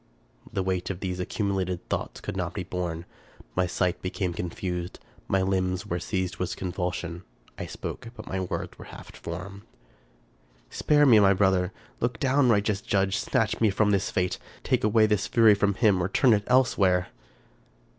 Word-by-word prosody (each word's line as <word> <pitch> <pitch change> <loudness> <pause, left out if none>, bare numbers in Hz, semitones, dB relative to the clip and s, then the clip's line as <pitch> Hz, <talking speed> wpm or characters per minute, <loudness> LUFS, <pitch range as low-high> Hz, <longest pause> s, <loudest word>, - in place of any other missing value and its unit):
The 95 - -1
weight 90 -1 -1
of 95 -2 -4
these 90 -2 -3
accumulated 95 -2 -2
thoughts - - -3
could - - -5
not - - -3
be - - -3
borne. 85 -2 -4 0.5
My 90 0 +2
sight 90 0 -1
became 90 -1 -2
confused; 90 +1 -4 0.3
my 95 -1 +2
limbs 95 -1 0
were 90 - -2
seized 95 -2 -2
with 90 - -2
convulsion; 90 -1 -3 0.4
I - - -4
spoke, - - -6
but - - -9
my 95 - -3
words 95 - -4
were - - -9
half - - -12
formed: 90 +4 -7 0.4
— - - -35
" - - -34
Spare 150 -1 +3
me, 115 -6 +7
my 100 -1 +6
brother! 95 -1 +2 0.3
Look 120 -2 -1
down, 135 -1 +3
righteous 105 -2 +2
Judge! 95 -1 +1
snatch 115 +1 0
me 110 - +5
from 105 +1 +2
this 100 -1 +1
fate! 90 0 -1 0.2
take - - +1
away 110 +1 +4
this 105 -1 +1
fury 115 -3 +6
from 100 -1 +1
him, 100 -4 +3
or 90 - -1
turn 120 +4 +4
it 105 -1 +1
elsewhere 100 -8 +3
95 Hz, 175 wpm, -27 LUFS, 90-105 Hz, 0.5 s, me